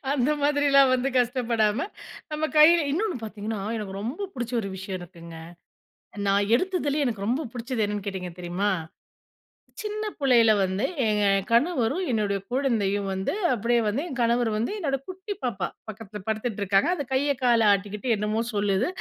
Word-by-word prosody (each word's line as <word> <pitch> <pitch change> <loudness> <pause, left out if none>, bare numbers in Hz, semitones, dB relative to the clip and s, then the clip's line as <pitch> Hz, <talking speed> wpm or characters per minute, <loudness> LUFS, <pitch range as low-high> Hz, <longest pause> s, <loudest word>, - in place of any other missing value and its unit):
அந்த 270 +1 +1
மாதிரிலாம் 285 -2 +4
வந்து 255 +2 0
கஷ்டப்படாம 235 -3 +1 0.5
நம்ம 305 +1 -1
கையில 335 +3 +8
இன்னொன்னு 385 -1 0
பார்த்திங்கன்னா, 215 -1 -5 0.2
எனக்கு 195 -2 -5
ரொம்ப 280 - -4
பிடிச்ச 240 -1 -4
ஒரு 195 - -4
விஷயம் 190 0 -5
இருக்குங்க. 170 -2 -11 0.9
நான் 200 +1 +2
எடுத்ததுலயே 300 -6 0
எனக்கு 205 -3 -3
ரொம்ப 260 +3 0
பிடிச்சது 235 -2 -2
என்னன்னு 205 -1 -4
கேட்டிங்க 180 -3 -4
தெரியுமா? 185 +4 -1 1.1
சின்ன 425 0 -3
புள்ளையில 240 -5 +5
வந்து, 190 +2 0 0.2
எங்க 210 -1 +2 0.3
கணவரும் 285 +5 +2
என்னுடைய 205 -3 0
குழந்தையும் 215 -7 0
வந்து, 190 - -2 0.2
அப்டியே 235 +1 +1
வந்து 230 +8 0
என் 265 -5 -6
கணவர் 235 0 +2
வந்து 225 - -1
என்னோட 275 -7 -1
குட்டி 380 +2 -6
பாப்பா 195 -8 -1 0.2
பக்கத்தில 210 -1 -8
படுத்துட்டு 220 0 -2
இருக்காங்க. 195 - +3
அந்த 290 - -3
கைய, 280 +2 +2
காலை 235 -3 +4
ஆட்டிக்கிட்டு 205 +4 -3
என்னமோ 210 +2 -1
சொல்லுது. 205 - +1
230 Hz, 150 wpm, -25 LUFS, 205-275 Hz, 1.1 s, கையில